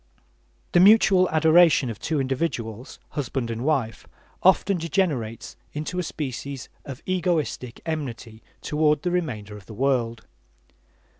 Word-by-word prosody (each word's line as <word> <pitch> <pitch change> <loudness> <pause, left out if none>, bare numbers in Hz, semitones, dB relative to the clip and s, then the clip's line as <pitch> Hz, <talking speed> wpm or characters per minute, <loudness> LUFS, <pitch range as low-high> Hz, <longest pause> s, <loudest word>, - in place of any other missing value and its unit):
The 175 - +4
mutual 190 -2 +6
adoration 160 -2 +5
of 105 - -9
two 155 -2 -1
individuals, 130 -4 -3
husband 130 -4 -3
and 115 +1 -4
wife, 135 -7 -1 0.3
often 190 0 +3
degenerates 145 - -2 0.2
into 155 +4 -4
a - - 0
species 140 -3 -5 0.2
of 140 +1 -8
egoistic 170 -9 -1
enmity 120 -8 -5 0.2
toward 150 -1 +1
the 180 - 0
remainder 110 - -3
of 100 -2 -13
the 110 - -10
world. 120 -3 0
145 Hz, 125 wpm, -24 LUFS, 120-165 Hz, 0.3 s, mutual